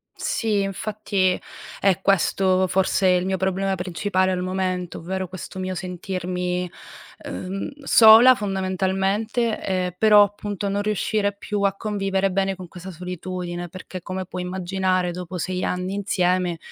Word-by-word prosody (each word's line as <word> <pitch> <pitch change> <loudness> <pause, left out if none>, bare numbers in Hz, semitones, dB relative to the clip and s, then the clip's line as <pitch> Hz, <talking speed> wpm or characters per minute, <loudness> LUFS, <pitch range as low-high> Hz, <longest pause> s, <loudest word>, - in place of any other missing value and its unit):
Sì, 215 -3 0
infatti, 195 -1 -1 0.4
è 195 -1 +2
questo 190 -1 +2
forse 190 +1 +2
il 180 0 +3
mio 190 0 0
problema 190 +1 0
principale 185 +1 0
al 180 -1 -1
momento, 185 -1 -2
ovvero 185 +2 -4
questo 185 +1 -8
mio 185 0 -3
sentirmi, 180 -1 -3 0.6
uhm, 190 +2 -4
sola 230 +1 +8
fondamentalmente, 195 +3 -1
ehm, 185 -1 -1
però 210 -1 +7
appunto 205 -1 -3
non 200 +1 0
riuscire 205 0 0
più 205 0 -3
a 200 -1 +2
convivere 195 -2 -1
bene 195 0 0
con 180 -1 -9
questa 180 +2 -10
solitudine, 180 0 -5
perché 185 0 -8
come 185 +1 -5
puoi 180 0 -6
immaginare 185 0 -1
dopo 180 +1 -6
6 185 +2 -2
anni 180 +1 -2
insieme 180 -3 0
190 Hz, 135 wpm, -23 LUFS, 180-195 Hz, 0.6 s, sola